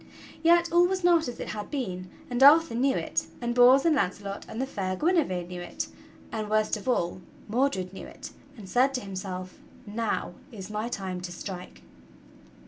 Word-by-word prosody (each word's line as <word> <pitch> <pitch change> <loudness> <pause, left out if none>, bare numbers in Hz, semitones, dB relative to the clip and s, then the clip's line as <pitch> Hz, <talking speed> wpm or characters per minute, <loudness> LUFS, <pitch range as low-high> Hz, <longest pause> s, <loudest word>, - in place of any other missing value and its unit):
Yet 340 +1 +4
all 350 +1 +5
was 375 0 -2
not 340 -2 +4
as 245 - -6
it - - -5
had 210 -1 -5
been, 185 -10 -4 0.2
and 245 +1 -2
Arthur 305 +1 +7
knew 265 +3 +2
it, - - -1
and 240 -1 -2
Bors 250 +3 +6
and 325 -2 +4
Launcelot 200 -4 -2
and 220 - -6
the 265 - 0
fair 190 -7 -3
Guinevere 290 - +1
knew 180 0 -7
it, 175 - -5 0.4
and, 215 -2 -3
worst 215 0 +2
of 215 +4 -5
all, 185 -6 0 0.3
Mordred 210 -6 0
knew - - -8
it, - - -10 0.3
and 205 -4 -10
said 260 +6 +3
to 255 - -1
himself: 185 -2 -6 0.3
"Now 220 +1 -2 0.2
is 205 -3 -8
my 215 +2 -2
time 185 -5 -4
to 180 -1 -6
strike!" 180 0 -8
220 Hz, 185 wpm, -27 LUFS, 185-270 Hz, 0.4 s, Arthur